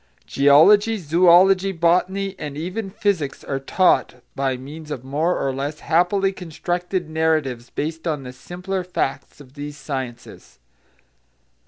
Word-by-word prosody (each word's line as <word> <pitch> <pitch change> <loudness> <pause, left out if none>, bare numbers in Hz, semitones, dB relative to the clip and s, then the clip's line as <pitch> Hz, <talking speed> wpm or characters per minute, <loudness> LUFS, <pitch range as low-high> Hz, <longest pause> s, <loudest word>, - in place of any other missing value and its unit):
Geology, 200 +11 +5
zoology, 185 +3 +4
botany, 185 +3 +1
and 145 -1 -6
even 185 +6 -4
physics 190 -8 -2
are 135 -1 -3
taught 180 +5 +2 0.2
by 135 -2 -1
means 150 +4 -10
of 130 -4 -5
more 150 +7 0
or 135 - -1
less 145 +3 -4
happily 190 +4 +2
constructed 180 +1 -3
narratives 155 -6 -1
based 160 +3 -4
on 150 -4 -2
the 125 -1 -8
simpler 180 +8 -5
facts 180 -5 -3
of 135 -3 -15
these 145 0 -7
sciences. 130 -5 -7
160 Hz, 130 wpm, -21 LUFS, 140-185 Hz, 0.2 s, Geology